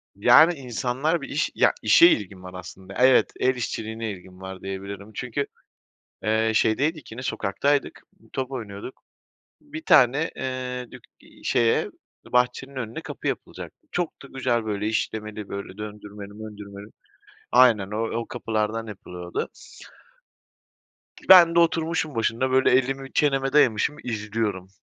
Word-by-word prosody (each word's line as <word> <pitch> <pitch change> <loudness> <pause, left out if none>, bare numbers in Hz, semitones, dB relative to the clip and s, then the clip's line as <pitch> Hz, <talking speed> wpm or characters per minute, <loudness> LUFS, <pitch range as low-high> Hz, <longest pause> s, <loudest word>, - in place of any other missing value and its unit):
Yani 125 +11 +6
insanlar 135 +4 -2
bir - - -7
iş 150 - -1
ya - - +4
işe 340 - +7
ilgim 100 - 0
var 90 0 -9
aslında 95 +1 -10
evet 130 0 +4
el 130 0 +2
işçiliğine 110 -2 -4
ilgim 95 0 -12
var 95 -1 -8
diyebilirim. 100 +2 -7
Çünkü, 125 +3 -2 0.8
eee, 110 +1 +1
şeydeydik 140 +6 +1
yine 125 +3 -7
sokaktaydık, 140 +6 -1 0.3
top 130 0 -3
oynuyorduk. 110 -1 -7 0.6
Bir 305 +2 -9
tane, 135 +6 +4
eee, 125 -1 -4
dük - - -12 0.2
eee, - - -19
şeye 120 -3 +2 0.5
bahçenin 125 +2 +1
önüne 125 +5 -5
kapı - - -6
yapılacaktı. 315 - -6
Çok 175 -2 -3
da - - -10
güzel 120 -4 -1
böyle 105 0 -2
işlemeli 110 -1 -3
böyle 100 0 -7
döndürmeli 105 -1 -9
möndürmeli. 105 -1 -10 0.6
Aynen 115 -6 +5
o 115 +2 -2
o 115 - -6
kapılardan 110 -1 -2
yapılıyordu. 90 -4 -6 1.8
Ben 170 -3 +9
de - - +6
oturmuşum 165 -3 +1
başında 115 +3 0
böyle 130 -1 +4
elimi 135 +1 0
çeneme 135 -2 +1
dayamışım 140 0 +3
izliyorum. 105 -4 -3
115 Hz, 130 wpm, -24 LUFS, 105-135 Hz, 1.8 s, Ben